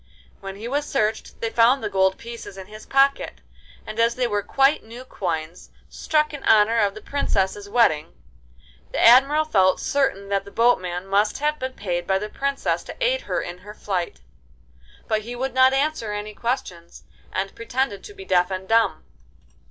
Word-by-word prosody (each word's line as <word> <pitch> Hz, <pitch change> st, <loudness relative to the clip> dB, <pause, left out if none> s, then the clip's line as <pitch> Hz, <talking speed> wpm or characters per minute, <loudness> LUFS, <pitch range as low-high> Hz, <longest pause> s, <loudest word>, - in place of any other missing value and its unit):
When 195 Hz, 0 st, -7 dB
he 215 Hz, +4 st, -7 dB
was 290 Hz, +3 st, -2 dB
searched 215 Hz, -5 st, -2 dB
they 225 Hz, -, -2 dB
found 240 Hz, +4 st, +4 dB
the -, -, 0 dB
gold 190 Hz, -1 st, +2 dB
pieces 230 Hz, -4 st, -9 dB
in 190 Hz, -, -8 dB
his 215 Hz, +2 st, -12 dB
pocket, 275 Hz, +1 st, +2 dB, 0.5 s
and 215 Hz, -, -7 dB
as 230 Hz, +1 st, +3 dB
they 255 Hz, -, 0 dB
were 205 Hz, -3 st, 0 dB
quite 270 Hz, +7 st, +2 dB
new 235 Hz, +3 st, -11 dB
coins, 170 Hz, -6 st, -5 dB, 0.2 s
struck 305 Hz, -1 st, 0 dB
in 285 Hz, -, -7 dB
honour 220 Hz, +1 st, +5 dB
of 205 Hz, -2 st, +1 dB
the 215 Hz, -, -10 dB
Princess's 200 Hz, -7 st, -1 dB
wedding, 165 Hz, -9 st, +2 dB, 0.8 s
the -, -, -3 dB
Admiral 275 Hz, +6 st, +6 dB
felt 190 Hz, -10 st, +3 dB
certain 200 Hz, -8 st, -1 dB
that 200 Hz, -1 st, 0 dB
the 200 Hz, -, -12 dB
boatman 185 Hz, -6 st, +1 dB
must 200 Hz, +2 st, +1 dB
have 300 Hz, +1 st, -1 dB
been 260 Hz, 0 st, -4 dB
paid 175 Hz, -5 st, -3 dB
by 190 Hz, -, +2 dB
the 210 Hz, +2 st, -5 dB
Princess 275 Hz, +4 st, -1 dB
to -, -, -9 dB
aid -, -, +1 dB
her -, -, -1 dB
in 175 Hz, +1 st, -7 dB
her 210 Hz, +3 st, -12 dB
flight. 180 Hz, -, -3 dB, 0.9 s
But 215 Hz, -1 st, 0 dB
he 240 Hz, +3 st, -7 dB
would 260 Hz, +1 st, -3 dB
not 260 Hz, 0 st, +5 dB
answer 270 Hz, -5 st, -1 dB
any 210 Hz, +1 st, -5 dB
questions, 190 Hz, -7 st, -4 dB, 0.3 s
and 195 Hz, +1 st, -3 dB
pretended 230 Hz, -2 st, -3 dB
to 415 Hz, -, -11 dB
be 390 Hz, -1 st, -10 dB
deaf 180 Hz, -, +2 dB
and 190 Hz, 0 st, -5 dB
dumb. 225 Hz, +1 st, +2 dB
220 Hz, 185 wpm, -23 LUFS, 195-260 Hz, 0.9 s, Admiral